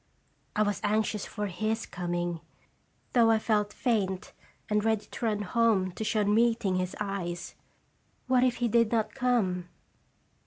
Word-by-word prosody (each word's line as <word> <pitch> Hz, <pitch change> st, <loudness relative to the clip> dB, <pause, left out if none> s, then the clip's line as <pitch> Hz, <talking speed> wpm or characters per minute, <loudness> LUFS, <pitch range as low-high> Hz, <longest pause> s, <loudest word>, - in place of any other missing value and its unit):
I 215 Hz, -, +3 dB
was 205 Hz, -1 st, -1 dB
anxious 210 Hz, 0 st, 0 dB
for 210 Hz, -1 st, -4 dB
his 215 Hz, +4 st, -2 dB
coming, 175 Hz, -1 st, -3 dB, 0.7 s
though 235 Hz, -2 st, +5 dB
I 225 Hz, -, +5 dB
felt 210 Hz, -2 st, +1 dB
faint 200 Hz, -7 st, -1 dB, 0.3 s
and 210 Hz, 0 st, +1 dB
ready 220 Hz, -2 st, +1 dB
to 235 Hz, -, -6 dB
run 210 Hz, -1 st, 0 dB
home 205 Hz, -3 st, +2 dB
to 220 Hz, -, -5 dB
shun 210 Hz, -1 st, +1 dB
meeting 225 Hz, -4 st, +2 dB
his 185 Hz, 0 st, -2 dB
eyes. 195 Hz, -4 st, -4 dB, 0.7 s
What 255 Hz, -1 st, +3 dB
if 250 Hz, -2 st, +2 dB
he 240 Hz, -, 0 dB
did 230 Hz, -1 st, +3 dB
not 225 Hz, -2 st, 0 dB
come 210 Hz, -9 st, 0 dB
210 Hz, 150 wpm, -29 LUFS, 190-230 Hz, 0.7 s, though